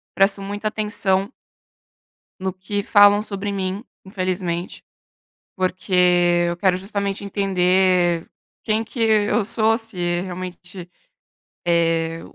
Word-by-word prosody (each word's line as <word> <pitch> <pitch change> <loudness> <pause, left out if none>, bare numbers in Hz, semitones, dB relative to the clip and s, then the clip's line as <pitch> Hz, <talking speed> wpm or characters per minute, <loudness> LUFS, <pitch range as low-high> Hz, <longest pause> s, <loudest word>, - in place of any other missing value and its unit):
presto 195 0 +2
muita 205 +2 -3
atenção 205 -2 -1 1.1
no 190 -1 -3
que 200 +2 -4
falam 205 0 +6
sobre 205 -1 -5
mim, 195 +2 -3 0.2
infelizmente. 185 -2 -3 0.7
Porque 185 +1 -3 0.5
eu 170 0 -2
quero 185 -1 +2
justamente 200 +1 -3
entender 185 -3 +1 0.4
quem 220 0 0
que 230 +2 -10
eu 215 -1 +2
sou, 225 0 +3
se 175 -6 -2
realmente 180 0 -8 0.8
eh, 165 -1 +1
190 Hz, 100 wpm, -21 LUFS, 180-205 Hz, 1.1 s, falam